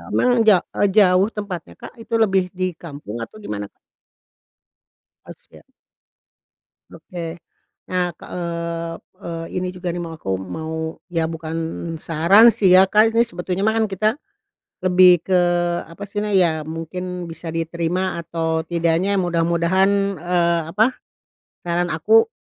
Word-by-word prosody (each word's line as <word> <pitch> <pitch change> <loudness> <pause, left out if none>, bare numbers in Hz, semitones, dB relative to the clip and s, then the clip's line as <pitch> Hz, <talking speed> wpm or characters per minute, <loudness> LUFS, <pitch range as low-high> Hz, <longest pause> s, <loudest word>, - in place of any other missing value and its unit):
Memang 245 -2 +3
ja 200 -4 +7 0.2
eee, 205 - +3
jauh 190 -2 +5
tempatnya, 180 - -6
Kak? - - -10
itu 230 - -10
lebih 190 -3 +2
di 185 -1 -3
kampung 145 - -8
atau 215 - -11
gimana? 105 - -6 1.5
Oh, - - -9
siap. - - -19 1.3
Oke. 165 0 -7 0.6
Nah 180 -1 +1
ke - - -16
eee, 170 -1 -4 0.3
eee, 165 -1 -5
ini 185 - -3
juga 180 -1 -3
nih 175 - -5
mau, 165 -1 -7
aku 95 - -7
mau, 160 - -6 0.4
ya, 165 -2 0
bukan 160 0 -6 0.4
saran 170 +9 +5
sih 200 -3 +1
ya, 190 +1 +7
Kak, 215 +2 +4
ini 230 +1 +4
sebetulnya 180 +1 -3
mah 220 - +2
kan 220 - +2
kita 205 +3 0 0.8
lebih 185 0 +6 0.2
ke 190 - +1 0.6
apa 165 - -11
sih 205 - -6
na 210 - -3
ya 180 -3 +5 0.2
mungkin 175 +2 -5
bisa 165 +1 -9
diterima 170 +2 -2
atau 165 -1 -3 0.2
tidaknya 170 +3 +1
mudah-mudahan, 170 +2 +2 0.3
eee, 170 -1 +1
apa 210 +6 +3 0.8
saran 175 0 0
aku 215 +8 +4
175 Hz, 140 wpm, -21 LUFS, 165-190 Hz, 1.5 s, ja